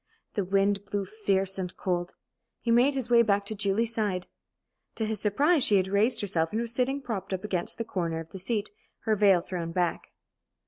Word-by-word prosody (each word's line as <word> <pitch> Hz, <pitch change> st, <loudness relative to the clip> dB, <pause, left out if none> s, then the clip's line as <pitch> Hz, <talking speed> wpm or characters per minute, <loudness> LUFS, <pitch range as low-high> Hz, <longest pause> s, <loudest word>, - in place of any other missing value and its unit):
The 205 Hz, -, 0 dB
wind 195 Hz, +1 st, +1 dB
blew 200 Hz, 0 st, -2 dB
fierce 195 Hz, -2 st, -1 dB
and 180 Hz, -1 st, -4 dB
cold. 175 Hz, -1 st, -2 dB, 0.4 s
He 235 Hz, -, -1 dB
made 250 Hz, +4 st, +4 dB
his 250 Hz, -3 st, -3 dB
way 235 Hz, -1 st, +7 dB
back 200 Hz, -3 st, +2 dB
to 215 Hz, -, -3 dB
Julie's 205 Hz, +3 st, 0 dB
side. 200 Hz, -5 st, -1 dB, 0.7 s
To 220 Hz, -, -1 dB
his 215 Hz, -1 st, -2 dB
surprise, 280 Hz, -, +3 dB
she 210 Hz, -, +4 dB
had 190 Hz, 0 st, +1 dB
raised 205 Hz, +5 st, +2 dB
herself 170 Hz, -5 st, 0 dB
and 220 Hz, -, -1 dB
was 235 Hz, 0 st, -2 dB
sitting 270 Hz, +3 st, 0 dB
propped 200 Hz, -6 st, -4 dB
up 190 Hz, +1 st, -3 dB
against 185 Hz, -4 st, -3 dB
the 230 Hz, -, -2 dB
corner 170 Hz, -6 st, -2 dB
of 165 Hz, 0 st, -9 dB
the 190 Hz, -, -7 dB
seat, 210 Hz, +2 st, -2 dB, 0.3 s
her 220 Hz, -1 st, +1 dB
veil 195 Hz, -4 st, +5 dB
thrown 170 Hz, -2 st, -4 dB
back. 175 Hz, -1 st, -1 dB
200 Hz, 200 wpm, -28 LUFS, 185-225 Hz, 0.7 s, way